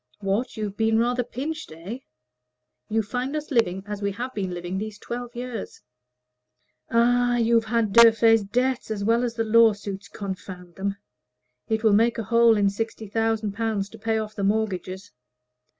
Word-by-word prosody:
"What! 205 +5 -2
you've 210 -2 -3
been 220 0 +2
rather 245 +2 +1
pinched, 300 - -5
eh?" 175 +10 -7 0.9
"You 220 +1 +1
find 250 +7 -3
us 305 0 -4
living 195 -7 +1
as 205 0 -6
we 200 -1 -1
have 250 +5 -5
been 195 -3 -3
living 175 +2 -4
these 215 0 -5
twelve 240 +1 -6
years." 240 -3 -6 1.1
"Ah, 245 +1 +3
you've 230 -1 +3
had 220 -2 0
Durfey's 225 -1 +7
debts 250 +5 -1
as 210 -2 -3
well 230 +3 +2
as 235 -1 -2
the 225 - 0
lawsuits 215 -3 +2
confound 185 -3 -7
them! 195 +2 -3 0.7
It 220 0 0
will 220 -2 +5
make 230 +3 +3
a 225 - -2
hole 230 +1 +4
in 200 -1 +3
sixty 225 +1 -4
thousand 225 0 0
pounds 210 -1 -2
to 225 - -13
pay 225 +1 0
off 215 -1 -4
the 200 - -4
mortgages. 195 -2 -2
220 Hz, 165 wpm, -25 LUFS, 200-235 Hz, 1.1 s, Durfey's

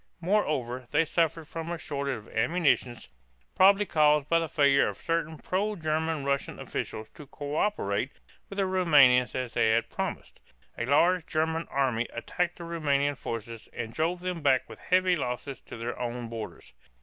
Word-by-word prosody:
Moreover, 150 - 0
they 160 +2 +3
suffered 165 0 0
from 165 0 -6
a 170 - -2
shortage 140 -4 -3
of 110 - -13
ammunition, 125 -1 +2 0.6
probably 200 +2 +6
caused 150 -4 +3
by 165 - +4
the 165 -1 -3
failure 140 -2 +4
of - - -4
certain 165 -1 -2
pro 205 +7 -1
German 160 -3 -1
Russian 140 0 -1
officials 110 0 -5
to 150 - -13
coöperate 145 - -2 0.3
with 200 - -8
the 195 - +2
Roumanians 145 - +5
as 125 -2 -3
they 115 -2 +3
had 110 +1 +1
promised. - - -5 0.4
A 115 - -3
large 170 +5 +3
German 160 +1 -1
army 125 -4 0
attacked 175 +9 -2
the 170 - -8
Roumanian 145 -4 0
forces 115 -3 -6
and 115 -1 -5
drove 170 +3 -1
them 180 -2 -3
back 135 -3 +3
with - - -11
heavy 185 0 +3
losses 130 -1 -4
to - - -8
their 115 +1 -4
own 120 -1 -4
borders. 110 - -8
150 Hz, 165 wpm, -28 LUFS, 125-170 Hz, 0.6 s, probably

